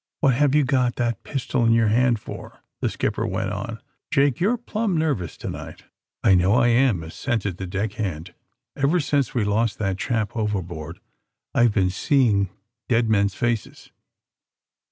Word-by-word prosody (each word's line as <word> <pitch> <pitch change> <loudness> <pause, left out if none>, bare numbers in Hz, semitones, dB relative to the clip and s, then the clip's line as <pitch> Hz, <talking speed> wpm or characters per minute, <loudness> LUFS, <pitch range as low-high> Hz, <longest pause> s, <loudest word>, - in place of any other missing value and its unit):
What 140 -5 +4
have 140 +3 +2
you 150 - +5
got 125 -2 +1
that 120 -3 -1
pistol 135 -2 -2
in 115 0 +4
your 115 -2 +3
hand 120 +1 +3
for?" - - -10 0.2
the - - 0
skipper - - -2
went - - -2
on. - - -5 0.3
Jake, 140 -3 +2
you're 215 +7 +2
plumb 220 -5 -2
nervous 140 - -1
to - - -7
night." - - -7 0.2
' - - -57
^'1 95 -2 +6
know 95 +3 +3
I 120 -1 +4
am," 120 -7 +3
assented 100 +2 -3
the 95 - -5
deck 100 +3 -2
hand. 90 -5 -4 0.2
*' 120 -1 -62
Ever 145 +6 +2
since 140 -4 0
we 120 - +2
lost 105 +1 0
that 95 -3 -2
chap 110 -5 -1
overboard 90 -7 -3 0.5
I've 120 -2 +4
been 95 -3 +2
seeing 105 -3 +2 0.4
dead 115 -2 +2
men's 100 -2 +2
faces!" 115 -5 -3
115 Hz, 175 wpm, -23 LUFS, 100-130 Hz, 0.5 s, ^'1